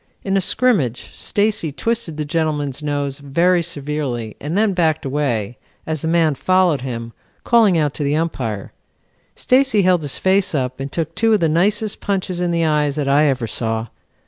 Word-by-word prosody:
In 195 0 -1
a 195 - +3
scrimmage 175 - +1
Stacy 205 -6 -1
twisted 200 0 -2
the 150 - -2
gentleman's 150 -3 -2
nose 145 -2 -2
very 170 +6 +2
severely 145 -8 -3
and 155 +6 -3
then 215 -1 +2
backed 160 -4 +1
away, 125 -6 -2 0.3
as 155 -2 -3
the - - -2
man 165 -2 +3
followed 180 0 +2
him, 115 -3 -5 0.3
calling 220 -7 +4
out 150 -3 +1
to 150 - -4
the 145 +1 +1
Umpire. 125 -11 -3 0.6
Stacy 255 -5 +3
held 180 -2 +3
his 145 -3 -2
face 190 -2 +2
up 130 -2 -2
and 135 +1 -5
took 165 -1 -3
two 225 +3 +2
of 215 - +3
the 165 - +2
nicest 205 +6 +1
punches 185 -3 -2
in 180 -1 0
the 170 -1 +1
eyes 150 -2 +1
that 145 -2 -2
I 145 +2 +4
ever 130 -4 0
saw. 115 0 -2
155 Hz, 180 wpm, -19 LUFS, 140-185 Hz, 0.6 s, calling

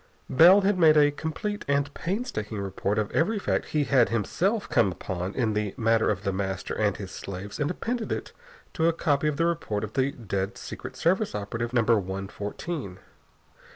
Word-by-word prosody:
Bell 175 +9 +8
had 195 -1 +1
made 155 -2 +6
a 145 -1 +6
complete 160 +8 -4
and 140 0 +1
painstaking 170 - -3
report 100 +1 -2
of 105 -1 -1
every 210 +7 +1
fact 200 - -1
he 150 -1 +1
had 130 -4 +3
himself 180 - 0
come 100 -5 +3
upon 90 +1 -4
in 115 -4 +1
the 105 -2 -2
matter 115 0 +3
of 100 -2 -1
The 100 -2 -1
Master 95 -1 -3
and 105 -3 0
his 95 -3 -7
slaves 100 +2 -7
and 145 0 0
appended 230 +5 -3 0.4
to 160 - -1
it - - +6
a - - +1
copy 150 -2 +1
of 150 -2 -1
the 165 - +2
report 130 -12 -1
of 110 - -5
the 135 0 +2
dead 100 -5 -3
Secret - - -8
Service 190 - +1
operative 115 +3 -3
Number 115 -2 +3
One 95 0 -4
Fourteen. 105 - -5
120 Hz, 190 wpm, -27 LUFS, 100-165 Hz, 0.4 s, Bell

